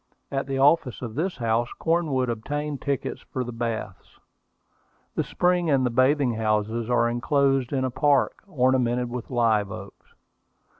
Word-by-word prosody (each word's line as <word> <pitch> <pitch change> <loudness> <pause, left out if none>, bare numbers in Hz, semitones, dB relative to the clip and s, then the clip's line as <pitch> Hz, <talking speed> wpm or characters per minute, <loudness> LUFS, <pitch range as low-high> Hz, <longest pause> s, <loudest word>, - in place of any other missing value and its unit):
At 135 0 -2
the 135 -1 -2
office 135 -2 +3
of 115 -3 -5
this 170 - -2
house 115 0 0
Cornwood 160 -6 +1
obtained 145 +5 -3
tickets 140 -2 -2
for 130 - -4
the 120 - -6
baths. 115 -4 -5 0.9
The - - 0
spring 180 -1 +1
and 135 -3 +3
the 125 - 0
bathing 130 +1 +3
houses 110 +1 -1
are 120 -1 +3
inclosed 135 +2 +1
in 130 -2 0
a 130 - -2
park, 140 +1 +2
ornamented 125 -5 +1
with 120 -2 -5
live 110 -5 +2
oaks. - - -11
130 Hz, 150 wpm, -25 LUFS, 115-140 Hz, 0.9 s, office